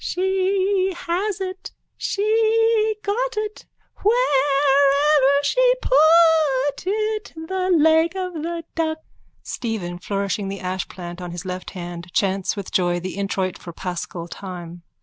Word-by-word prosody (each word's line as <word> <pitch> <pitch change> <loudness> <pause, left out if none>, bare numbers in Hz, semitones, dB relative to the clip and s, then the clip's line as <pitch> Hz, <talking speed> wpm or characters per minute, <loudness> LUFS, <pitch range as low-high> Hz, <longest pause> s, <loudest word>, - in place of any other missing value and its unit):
_ - - -14
She 380 +1 +1
has 370 +4 -2
it, 375 0 -5 0.3
she 440 +1 +2
got 465 +3 -1
it, 425 0 -4 0.3
Wherever 285 - +3
she - - +4
put 315 - +4
it, 430 +1 -1
The 370 +3 -3
leg 320 +1 +4
of 365 -1 -3
the 335 +1 -4
duck. 315 -1 -1 0.5
(Stephen, 190 -7 -4
flourishing 200 +1 -2
the 195 0 -4
ashplant 180 -1 -5
in 180 - -5
his 175 0 -7
left 185 0 -5
hand, 175 0 -7
chants 195 0 0
with 200 -2 -6
joy 175 -1 +1
the 185 +1 -6
introit 195 -2 -2
_for 170 -2 -10
paschal 175 -1 -5
time. 175 -2 -8
305 Hz, 130 wpm, -22 LUFS, -, 0.5 s, she